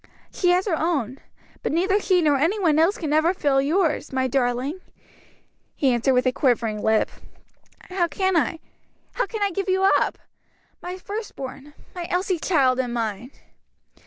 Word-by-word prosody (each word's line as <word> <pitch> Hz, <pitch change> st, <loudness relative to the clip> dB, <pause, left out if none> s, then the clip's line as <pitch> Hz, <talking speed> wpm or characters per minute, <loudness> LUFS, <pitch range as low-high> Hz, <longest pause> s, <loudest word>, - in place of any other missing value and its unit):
"She 360 Hz, -, +1 dB
has 360 Hz, +1 st, +3 dB
her 375 Hz, -6 st, +1 dB
own; 285 Hz, -7 st, -1 dB, 0.4 s
but -, -, -2 dB
neither 380 Hz, +6 st, +2 dB
she 370 Hz, -4 st, +2 dB
nor 295 Hz, -2 st, +3 dB
any 330 Hz, +10 st, +1 dB
one 320 Hz, -6 st, +2 dB
else 345 Hz, +7 st, +3 dB
can 305 Hz, -4 st, -2 dB
ever 320 Hz, +4 st, +3 dB
fill 275 Hz, -5 st, +2 dB
yours, 315 Hz, +2 st, 0 dB
my 260 Hz, 0 st, 0 dB
darling," 255 Hz, +5 st, -1 dB, 1.0 s
he 270 Hz, -3 st, +2 dB
answered 255 Hz, +2 st, +2 dB
with 250 Hz, -, +2 dB
a 255 Hz, -, +3 dB
quivering 235 Hz, -5 st, 0 dB
lip. 220 Hz, 0 st, +2 dB, 0.7 s
"How 365 Hz, -2 st, -1 dB
can 375 Hz, +4 st, 0 dB
I 325 Hz, 0 st, +1 dB, 0.5 s
how -, -, -2 dB
can 440 Hz, -3 st, -3 dB
I 400 Hz, -, +1 dB
give 390 Hz, +2 st, -3 dB
you 380 Hz, +1 st, +2 dB, 0.2 s
up? -, -, -1 dB, 0.6 s
my 360 Hz, +1 st, -6 dB
first 415 Hz, +3 st, -6 dB
born, 275 Hz, +2 st, -8 dB, 0.2 s
my 350 Hz, -2 st, -5 dB
Elsie's 360 Hz, -1 st, -1 dB
child 265 Hz, -7 st, +2 dB
and 245 Hz, -2 st, -2 dB
mine." 225 Hz, 0 st, -3 dB
310 Hz, 170 wpm, -23 LUFS, 260-370 Hz, 1.0 s, has